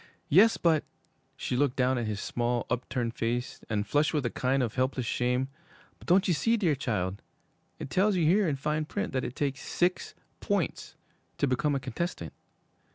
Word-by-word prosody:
'Yes, 205 +9 +6
but 160 -3 +3 0.3
' - - -42
She - - -2
looked 135 0 +2
down 130 0 +2
at 115 - -2
his 105 -1 -3
small, 120 +2 -1
upturned 120 -1 -1
face, 120 +2 -2
and 105 -2 0
flushed 145 +9 +1
with 145 -4 0
a 120 - 0
kind 130 +1 +1
of 115 - -2
helpless 130 0 0
shame, 125 +2 0 0.5
'but - - -15
don't 185 +3 +4
you 180 - +3
see, 230 +8 +2
dear 180 -8 +2
child 100 -8 -2 0.6
it - - -7
tells 195 +2 +3
you 170 -3 +2
here, 190 +4 +4
in 145 - 0
fine 150 +3 -1
print, 205 +4 -3
that 130 -1 0
it 125 - -5
takes 140 -1 -2
six 180 +1 -1 0.2
points - - -2 0.4
to - - +2
become 140 +2 +1
a - - 0
contestant?' 170 +8 -4
135 Hz, 190 wpm, -29 LUFS, 120-160 Hz, 0.6 s, Yes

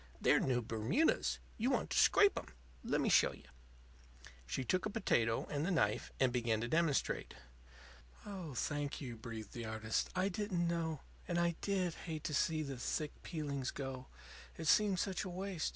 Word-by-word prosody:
They're - - +5
new 125 -2 +1
Bermudas. 115 - +1 0.2
You 240 +4 +2
want 270 - 0
to - - 0
scrape 405 -1 +6
'em. - - -4 0.4
Lemme - - +1
show - - +5
you." - - -14 1.0
She 95 - -2
took 185 - +1
a - - -4
potato 115 - +1
and 145 0 -2
the 175 - 0
knife, 175 -4 +1
and 130 -2 +3
began 115 -3 +1
to 120 - -1
demonstrate. 160 +1 +1 0.9
"Oh, 185 -9 -6
thank 145 +3 -2
you," 125 -5 -5
breathed 110 -2 -7
the 120 -1 -5
artist. 110 0 -1
"I 185 +1 +2
didn't 190 -3 -1
know. 165 -3 -1 0.3
And 175 - 0
I 170 -1 +2
did 185 -4 0 0.2
hate 155 -2 -4
to 155 - -2
see 155 +1 +1
the 140 -3 -5
thick 150 +5 -3
peeling 145 -5 -3
go; 130 -2 -5 0.5
it 160 - -5
seemed 200 +3 +4
such 190 0 -1
a 190 - -5
waste. 185 -1 -2
155 Hz, 175 wpm, -36 LUFS, 125-185 Hz, 1.0 s, scrape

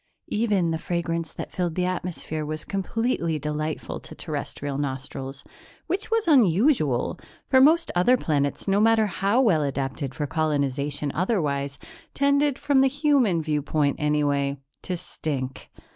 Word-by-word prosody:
Even 205 -6 +1
the 160 - -1
fragrance 170 -2 -2
that - - -7
filled 175 -3 -2
the 180 - +1
atmosphere 175 -3 -3
was 155 +1 -5
completely 195 -5 -1
delightful 150 +1 -3
to - - -10
Terrestrial 145 -2 -4
nostrils 135 0 -5 0.4
which 375 +4 -3
was 450 -4 +1
unusual, 205 - +3 0.3
for 260 -1 +4
most 330 +4 +5
other 180 +9 +4
planets, 145 -5 -1
no 195 +1 +3
matter 225 0 +4
how 200 +4 +1
well 190 -12 +3
adapted 135 -1 -3
for 150 - -2
colonization 145 -1 -1
otherwise, 145 -7 -1 0.4
tended, 280 0 +2
from 275 -2 +3
the 270 - +5
human 270 - +2
viewpoint, 150 -1 0
anyway, 145 -2 +1 0.2
to 180 - -3
stink. 140 -7 -5
165 Hz, 135 wpm, -25 LUFS, 145-225 Hz, 0.4 s, most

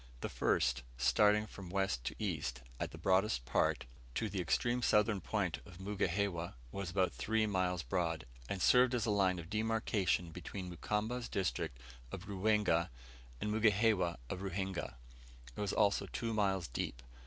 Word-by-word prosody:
The - - -2
first, - - +1 0.2
starting 105 - +4
from 95 -3 -9
west 95 -10 0
to - - -2
east, 65 +1 -2 0.2
at - - -2
the - - -10
broadest 95 - +2
part, - - +1 0.3
to 110 - 0
the 95 -1 -2
extreme 120 +8 +1
southern 105 -3 +3
point 100 -6 -1
of 90 -3 -13
Mugihewa, 95 -3 -1 0.2
was 100 +2 -4
about 95 0 +1
three 110 -1 +1
miles 90 -4 0
broad, 85 -5 -1 0.2
and 95 - -2
served 125 0 +6
as 115 - 0
a 110 - +1
line 95 -3 +3
of 85 -1 -7
demarcation 110 -5 +1
between 90 +2 -6
Mukamba's 110 +7 -2
district 95 -9 -1 0.3
of 95 0 -7
Ruwenga 100 -4 +2 0.5
and 105 - -1
Mugihewa 105 -5 +3
of 90 - -4
Ruhinga; 95 -4 -3 0.6
it - - -4
was 100 -1 0
also 100 -1 +2
two 115 -2 -3
miles 95 -5 +1
deep. - - -4
95 Hz, 155 wpm, -35 LUFS, 90-105 Hz, 0.6 s, served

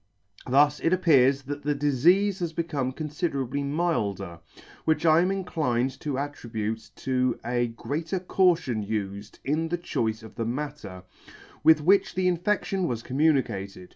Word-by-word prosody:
Thus 145 +3 +4
it 165 - +1
appears 140 -7 +4
that 145 +2 -5
the 145 0 0
difeafe 170 +8 +3
has 170 -2 -3
become 150 -6 -2
confiderably 140 -2 -3
milder; 105 - -1 0.4
which 160 0 +1
I 160 +1 +6
am 180 - +1
inclined 135 -9 -1
to 145 -3 -3
at 145 +1 -3
tribute 110 -3 -5
to 130 -1 0
a 120 0 0
greater 155 +10 -3
caution 170 - +1
ufed 100 -1 -4
in 155 +4 0
the 175 - -1
choice 110 -10 -2
of 110 - -11
the 115 - -3
matter, 120 -8 -5 0.6
with 160 -1 +6
which 190 +5 +3
the 185 0 +1
infection 185 +1 0
was 115 -4 -3
communicated. 125 - 0
145 Hz, 145 wpm, -26 LUFS, 120-165 Hz, 0.6 s, I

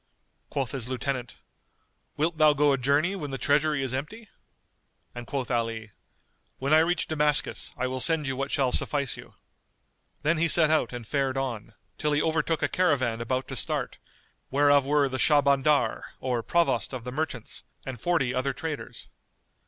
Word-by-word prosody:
Quoth 135 -4 -2
his 125 -3 -3
lieutenant, 130 -2 -3 0.8
"Wilt 160 +2 0
thou 155 -1 +6
go 145 0 +3
a - - +1
journey 145 +9 +2
when 150 -7 -5
the 135 - -4
treasury 150 +1 +1
is 130 -1 -3
empty?"; 205 - -6 0.8
and 120 -1 -8
quoth 135 -2 -3
Ali, 115 -2 -2 0.7
"When 140 +3 0
I 155 - +7
reach 175 +2 +1
Damascus 150 -1 0
I 130 - -1
will 130 0 -3
send 160 +2 +4
you 135 -1 -2
what 135 +1 -3
shall 135 -4 +1
suffice 140 -2 +1
you." - - -13 0.9
Then 155 +2 +2
he 170 - +3
set 160 -2 +5
out 155 -7 +2
and 120 -2 -7
fared 135 +1 -1
on, 115 -5 -4 0.2
till 150 -1 0
he 145 - +2
overtook 160 0 0
a - - +3
caravan 130 -10 +1
about 130 +2 -2
to - - -5
start, - - -2 0.5
whereof 145 0 +4
were 145 -1 +3
the 130 0 -4
Shah 145 +3 +5
bandar, 140 -3 +2 0.2
or 125 -2 -1
Provost 135 - 0
of 125 -3 -5
the 125 - -6
Merchants, 140 -4 -4 0.2
and 130 -4 -6
forty 160 -8 +1
other 130 +2 -1
traders. 155 +2 -6
140 Hz, 175 wpm, -27 LUFS, 130-150 Hz, 0.9 s, I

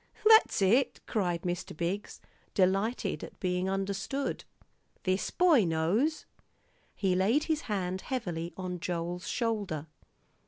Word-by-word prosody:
"That's 440 - +6
it," 235 +8 +3
cried 175 -6 -1
Mr. 175 -3 -4
Biggs, 180 +5 -3 0.4
delighted 195 -1 +1
at - - -10
being 180 0 0
understood. 195 +8 -2 0.6
"This 185 0 0
boy 340 - +4
knows." 180 - +1 0.7
He 190 -2 +1
laid 210 +11 +3
his 315 -1 0
hand 190 -2 -1
heavily 175 -10 -3
on 180 -1 -4
Joel's 175 0 -3
shoulder. 205 - -1
190 Hz, 115 wpm, -30 LUFS, 180-230 Hz, 0.7 s, That's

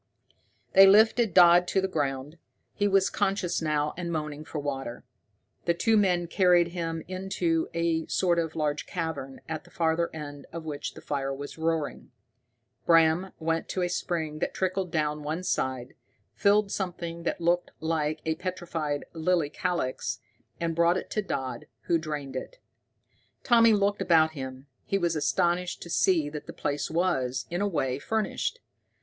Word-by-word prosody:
They 195 0 +9
lifted 220 +2 +5
Dodd 175 0 +7
to 190 - +1
the 190 - +1
ground. 145 -2 -3 0.3
He 205 - +1
was 195 -1 +3
conscious 195 -4 0
now, 150 -1 0
and 170 -1 -4
moaning 150 -2 -3
for 155 - -7
water. 135 -5 -4 0.6
The 170 - +2
two 225 +6 +2
men 180 -4 +3
carried 175 -1 +4
him 165 -2 -3
into 185 -3 -1
a 170 -1 0
sort 175 -2 +2
of 160 -1 -2
large 150 -2 -1
cavern, 160 -6 -4
at 160 -1 -4
the 175 - -18
farther 170 -1 0
end 145 -2 -8
of 165 -1 -7
which 145 -2 -5
the - - -10
fire 135 -2 -2
was 145 +3 -7
roaring. 160 -2 -2 0.8
Bram 165 +2 +4
went 165 0 -1
to 185 - -1
a 175 - 0
spring 160 -4 -2
that - - -2
trickled 185 0 -1
down 150 -2 0
one 155 +4 -3
side, 130 -7 -2 0.4
filled 205 0 +3
something 170 -3 -4
that 170 - -2
looked 175 +1 +1
like 155 -1 -1
a 160 - +1
petrified 165 -4 -3
lily 165 -2 +1
calyx, 170 -7 -2 0.4
and 165 -1 -1
brought 170 +2 +3
it - - -6
to 215 - 0
Dodd, 130 - -4
who 170 - +1
drained 150 -4 -5
it. - - -6 0.9
Tommy 230 -3 +6
looked 205 -1 +1
about 165 -4 +4
him. 130 -2 -7 0.2
He 195 - 0
was 170 -3 0
astonished 175 +4 0
to 170 - -9
see 165 -5 +3
that 150 0 -7
the - - -7
place 145 0 -2
was, 135 -7 0
in 175 +2 -1
a 205 - +2
way, 135 -8 -1
furnished. 220 - -2
165 Hz, 165 wpm, -28 LUFS, 150-180 Hz, 0.9 s, They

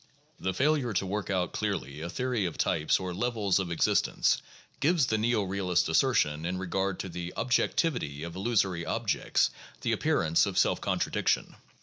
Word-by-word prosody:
The 95 - -1
failure 140 -2 +1
to 95 0 0
work 100 +2 -3
out 90 -3 0
clearly 70 +3 -3
a 85 - -4
theory 125 +1 -1
of 85 - -4
types 75 - +1
or 90 -1 -4
levels 105 -2 +1
of 90 -3 -3
existence 85 - +2 0.4
gives 160 -1 +3
the 110 -3 0
neo 115 -1 +2
realist 95 -2 0
assertion 80 - +2
in 90 +2 -2
regard 95 0 -1
to - - -6
the 90 +1 -6
objectivity 125 - 0
of 85 0 -6
illusory 95 -4 0
objects - - 0 0.3
the - - 0
appearance 80 0 +2
of - - -4
self - - +3
contradiction. - - 0
95 Hz, 160 wpm, -29 LUFS, 85-115 Hz, 0.4 s, gives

